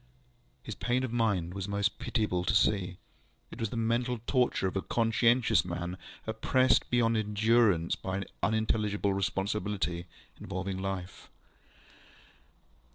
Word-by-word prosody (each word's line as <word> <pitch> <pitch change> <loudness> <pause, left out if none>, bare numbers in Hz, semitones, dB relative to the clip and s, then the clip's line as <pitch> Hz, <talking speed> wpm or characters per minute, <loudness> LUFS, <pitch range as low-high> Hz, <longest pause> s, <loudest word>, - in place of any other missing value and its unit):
ŌĆØ - - -36
His - - -4
pain 125 +1 0
of 125 -3 -3
mind 100 -7 0
was 95 0 -4
most 100 0 -1
pitiable 105 -7 -1
to 110 - +1
see. 95 -4 +2 0.5
It - - -10
was 115 - -1
the 120 - -5
mental 120 +2 0
torture 125 -6 +1
of 95 - -4
a 95 - 0
conscientious 115 +2 +3
man, 90 +1 -4 0.3
oppressed 130 +4 +2
beyond 115 -2 +2
endurance 105 -4 +2
by 95 0 -4
an 100 - -3 0.2
unintelligible 105 -2 +1
responsibility 95 -2 -2 0.3
involving 95 0 -4
life. 95 -2 -5
100 Hz, 130 wpm, -30 LUFS, 95-115 Hz, 0.5 s, conscientious